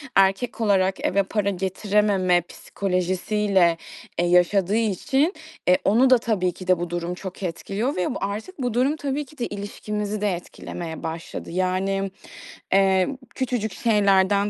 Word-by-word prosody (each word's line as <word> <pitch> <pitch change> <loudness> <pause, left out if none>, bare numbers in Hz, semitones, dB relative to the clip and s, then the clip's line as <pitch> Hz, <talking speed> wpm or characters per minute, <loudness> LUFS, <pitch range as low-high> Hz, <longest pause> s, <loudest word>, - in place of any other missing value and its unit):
erkek 195 +5 +2
olarak 195 -3 +2
eve 200 +1 +2
para 200 +1 -1
getirememe 190 -1 +1
psikolojisiyle, 185 0 0 0.4
eee, 175 - +3
yaşadığı 180 +3 +3
için, 250 - +1 0.3
eee, 180 0 +6
onu 240 +6 +5
da 255 - +7
tabii 215 -6 0
ki 185 +1 -11
de 185 -2 +4
bu 175 0 -3
durum 175 0 -3
çok 190 +1 -8
etkiliyor 195 - -2
ve 180 - -1
bu - - -1
artık 215 - -4
bu 245 -3 -1
durum 260 +5 +2
tabii 285 -1 -3
ki 295 +3 -18
de 240 - -2
ilişkimizi 205 +1 -4
de 210 -1 +2
etkilemeye 170 -1 -7
başladı. 165 +1 -6
Yani, 190 +2 0 0.6
emm, 195 +6 +3 0.2
küçücük 240 -5 -1
şeylerden 200 -2 +3
195 Hz, 145 wpm, -24 LUFS, 185-215 Hz, 0.6 s, da